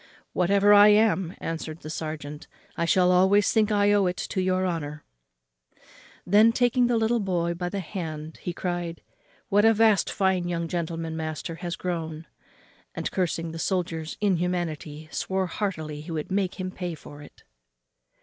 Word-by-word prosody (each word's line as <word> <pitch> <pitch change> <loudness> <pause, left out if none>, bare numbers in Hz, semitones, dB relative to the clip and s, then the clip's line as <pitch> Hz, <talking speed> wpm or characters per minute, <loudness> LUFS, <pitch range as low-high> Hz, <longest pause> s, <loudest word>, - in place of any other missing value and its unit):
"Whatever 200 +3 +4
I 205 0 +9
am," 210 -4 +3
answered 165 0 -5
the 155 - -8
serjeant, 150 -2 -6 0.3
"I 170 - 0
shall 180 +1 +4
always 190 +2 +4
think 220 -1 +3
I 205 0 +3
owe 200 -2 +3
it 180 - -2
to 190 - -2
your 185 0 +1
honour." 150 -4 -3 1.2
Then, 210 +5 +6
taking 245 +1 +2
the 240 -1 +2
little 225 +1 +2
boy 175 -4 0
by 175 +1 -3
the 195 +1 -3
hand 160 -4 -6
he 175 - -3
cried, 175 -1 -4 0.5
"What 205 +1 +4
a 225 0 +5
vast 215 -2 +4
fine 190 -2 +1
young 170 -1 -2
gentleman 165 -1 -3
master 160 +1 -5
is 175 -2 -3
grown!" 165 -3 -4 0.7
and, - - -3
cursing 170 -3 -1
the 165 - -7
soldier's 165 -3 -2
inhumanity, 170 -6 -1
swore 190 0 -1
heartily 160 -5 -4
he 155 - -11
would 160 +1 -4
make 195 -1 -1
him 185 0 -3
pay 180 -3 -5
for 145 -1 -12
it. 145 - -15
180 Hz, 160 wpm, -26 LUFS, 160-195 Hz, 1.2 s, I